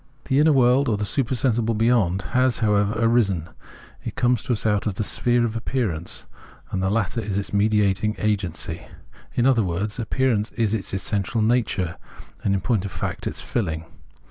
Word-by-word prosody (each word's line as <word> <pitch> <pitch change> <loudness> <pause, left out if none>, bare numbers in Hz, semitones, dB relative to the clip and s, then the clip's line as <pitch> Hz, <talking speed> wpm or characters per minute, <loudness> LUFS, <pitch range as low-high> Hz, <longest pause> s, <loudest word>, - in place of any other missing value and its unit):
The 135 - +2
inner 155 +1 +5
world, 130 0 +4
or 105 - +1
the 105 - -2
supersensible 120 -1 0
beyond, 105 -5 +2
has, 125 -1 +3
however, 105 -1 +2
arisen: 110 -8 +2 0.5
it - - -5
comes 125 -2 +2
to 125 - -1
us 110 - -3
out 105 -1 +1
of 100 - -2
the 110 - -1
sphere 120 +3 +2
of 115 -1 -3
appearance, 110 -9 -2 0.5
and 95 - -1
the 95 - +1
latter 110 +2 0
is 100 -2 -3
its 100 - -4
mediating 105 0 +2
agency: 100 -5 -2 0.5
in 120 - +2
other 130 -4 +4
words, 95 +5 -2
appearance 115 -1 0
is 110 -3 0
its 110 -3 -2
essential 100 +3 -1
nature 110 -7 0 0.5
and, 100 - +2
in 95 - -1
point 105 0 0
of 100 - -5
fact, - - -4
its - - -4
filhng. 80 -8 -2
110 Hz, 175 wpm, -23 LUFS, 100-120 Hz, 0.5 s, inner